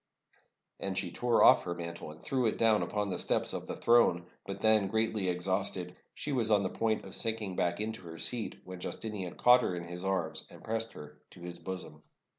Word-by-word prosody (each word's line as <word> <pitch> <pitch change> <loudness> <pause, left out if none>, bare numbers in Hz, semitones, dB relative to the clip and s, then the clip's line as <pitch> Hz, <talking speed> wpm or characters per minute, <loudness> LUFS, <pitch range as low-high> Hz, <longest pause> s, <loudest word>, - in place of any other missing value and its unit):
And 95 -1 -3
she 95 -3 -1
tore 120 +3 +3
off - - +8
her 85 -1 -2
mantle 85 -2 -6
and 75 +1 -11
threw 130 +5 0
it - - 0
down 110 -2 +4
upon 105 -2 -1
the - - -1
steps - - +1
of - - -5
the - - -4
throne. 115 -8 +4 0.2
But 100 0 -5
then, 110 -2 +4
greatly 110 -2 0
exhausted, 90 0 -1 0.2
she 150 - -4
was 120 -5 +1
on 105 -2 +4
the 95 - -2
point 110 -1 0
of - - -9
sinking 110 -4 -1
back 85 0 0
into 110 0 -3
her 80 0 -8
seat, 115 +5 -2
when 95 -1 -8
Justinian 100 -2 -5
caught 125 +1 +6
her 90 - -1
in 85 - -4
his 90 +1 -7
arms 95 0 -1
and - - -14
pressed 115 0 -2
her 75 0 -10 0.2
to 90 - -15
his 85 0 -6
bosom. 90 -5 -6
95 Hz, 215 wpm, -31 LUFS, 90-110 Hz, 0.2 s, off